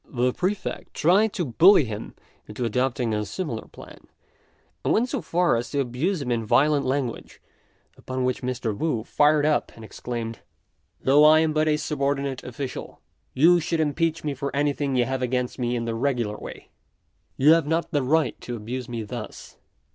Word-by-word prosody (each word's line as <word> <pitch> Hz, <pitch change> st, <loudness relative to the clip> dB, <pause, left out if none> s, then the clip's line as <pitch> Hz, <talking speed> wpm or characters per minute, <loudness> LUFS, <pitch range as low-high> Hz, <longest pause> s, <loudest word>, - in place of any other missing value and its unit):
The 125 Hz, -1 st, 0 dB
Prefect 190 Hz, +2 st, -3 dB
tried 195 Hz, +7 st, +3 dB
to 175 Hz, -, -2 dB
bully 160 Hz, -, +6 dB
him 105 Hz, -2 st, -7 dB, 0.3 s
into 110 Hz, +4 st, -4 dB
adopting 120 Hz, 0 st, 0 dB
a 105 Hz, 0 st, -1 dB
similar 125 Hz, -, -5 dB
plan, -, -, -14 dB, 0.8 s
and -, -, +1 dB
went 240 Hz, +4 st, +2 dB
so -, -, -2 dB
far 175 Hz, -2 st, +1 dB
as 115 Hz, +1 st, -3 dB
to 145 Hz, -, -2 dB
abuse 140 Hz, +7 st, -1 dB
him 125 Hz, -, -3 dB
in 115 Hz, -1 st, 0 dB
violent 145 Hz, +6 st, +2 dB
language; 130 Hz, -3 st, -3 dB, 0.6 s
upon 130 Hz, 0 st, -4 dB
which 125 Hz, 0 st, -1 dB
Mr. 125 Hz, -4 st, -2 dB
Wu 120 Hz, -3 st, -1 dB
fired 150 Hz, +3 st, +3 dB
up 150 Hz, -1 st, +1 dB
and 115 Hz, -, -11 dB
exclaimed, 115 Hz, 0 st, -6 dB, 0.6 s
"Though 140 Hz, +3 st, +5 dB
I 155 Hz, +1 st, +7 dB
am 160 Hz, -1 st, +1 dB
but 155 Hz, 0 st, +1 dB
a 150 Hz, -1 st, +2 dB
subordinate 140 Hz, -3 st, -2 dB
official, 125 Hz, +1 st, -7 dB, 0.4 s
you 170 Hz, +6 st, +5 dB
should 165 Hz, 0 st, -2 dB
impeach 160 Hz, +2 st, 0 dB
me 150 Hz, -2 st, -2 dB
for 140 Hz, +1 st, -4 dB
anything 145 Hz, -1 st, 0 dB
you 125 Hz, -1 st, +3 dB
have 130 Hz, 0 st, -3 dB
against 125 Hz, 0 st, -2 dB
me 120 Hz, 0 st, -1 dB
in 115 Hz, -1 st, -2 dB
the 115 Hz, -, -2 dB
regular 120 Hz, -3 st, -1 dB
way; -, -, -10 dB, 0.7 s
you 145 Hz, +4 st, +6 dB
have 165 Hz, -3 st, +2 dB
not 165 Hz, +1 st, -1 dB
the 145 Hz, -4 st, +1 dB
right 150 Hz, +3 st, +1 dB
to 120 Hz, -, -5 dB
abuse 120 Hz, +3 st, -6 dB
me 115 Hz, -2 st, -4 dB
thus. 110 Hz, +1 st, -8 dB
135 Hz, 180 wpm, -24 LUFS, 120-155 Hz, 0.8 s, I